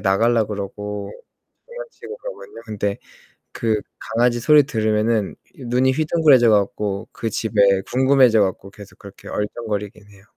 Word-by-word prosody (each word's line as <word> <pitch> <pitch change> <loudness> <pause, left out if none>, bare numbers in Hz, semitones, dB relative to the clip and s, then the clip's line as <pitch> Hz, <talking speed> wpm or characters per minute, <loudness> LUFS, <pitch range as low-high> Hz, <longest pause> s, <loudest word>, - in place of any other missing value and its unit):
나가려고 110 +3 +2
그러고 100 0 -6 0.6
장난치고 475 -2 -10
그러고 - - -8
있는데 105 -3 -4 0.6
그 110 -2 -1 0.2
강아지 120 +1 0
소리 150 +5 +6
들으면은 110 -4 0 0.2
이 130 - -12
눈이 125 +2 +2
휘둥그레져 150 -5 +4
갖고 100 0 0
그 115 - -4
집에 100 -3 +2
궁금해져 130 -3 +4
갖고 95 0 -3
계속 100 0 -14
그렇게 100 -1 -13
얼쩡거리긴 105 -1 -5
해요. 100 -1 -19
110 Hz, 335 characters per minute, -20 LUFS, 100-125 Hz, 0.6 s, 소리